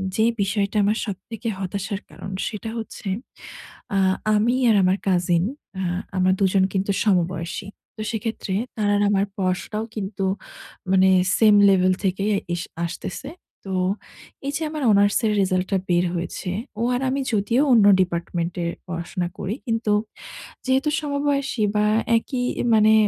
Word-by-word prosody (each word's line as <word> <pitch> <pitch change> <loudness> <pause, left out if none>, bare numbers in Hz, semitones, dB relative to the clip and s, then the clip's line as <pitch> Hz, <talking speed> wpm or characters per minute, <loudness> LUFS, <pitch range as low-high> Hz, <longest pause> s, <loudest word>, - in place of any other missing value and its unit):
যে 220 - +3 0.2
বিষয়টা 200 +1 0
আমার 210 +2 +2
সবথেকে 220 +3 -6
হতাশার 195 +2 -3
কারণ 190 - -8 0.2
সেটা 215 0 -5
হচ্ছে 225 -2 -7 0.9
আ - - +3 0.4
আমি 230 +4 +2
আর 220 - +5
আমার 185 +1 +3
কাজিন 175 -2 +2 0.4
আ - - -1 0.3
আমার 185 0 +4
দুজন 190 0 +3
কিন্তু 195 +1 0
সমবয়সী। 180 -2 0 0.3
তো 215 - -5
সেক্ষেত্রে 220 -3 -3 0.2
তার 210 -1 +1
আর 205 - +2
আমার 200 -1 +2
পড়াশোনাও 190 +3 -1
কিন্তু 195 -1 -4 0.7
মানে 190 0 +5 0.3
same 215 -2 +6
level 185 -1 +4
থেকেই 195 +2 0 0.2
এস 175 - -2 0.2
আসতেছে। 175 +8 -6 0.4
তো 195 - -5 0.8
এই 280 - 0
যে - - -8
আমার 305 -2 -4
অনার্স 205 0 +4
এর 215 - +3
রেজাল্টটা 185 0 +1
বের 175 0 +3
হয়েছে 175 +2 -4 0.3
ও - - -1
আর 250 - -1
আমি 275 +1 0
যদিও 220 +5 +2
অন্য 220 -3 +6 0.2
ডিপার্টমেন্ট 170 -1 -2
এ - - 0 0.2
পড়াশোনা 175 +1 -3
করি। 205 - -2
কিন্তু 225 -2 0 0.8
যেহেতু 265 +3 +2
সমবয়সী 280 -4 -1
বা 210 - +3 0.3
একই 250 +2 -4 0.3
মানে 215 0 +6
200 Hz, 145 wpm, -23 LUFS, 185-220 Hz, 0.9 s, same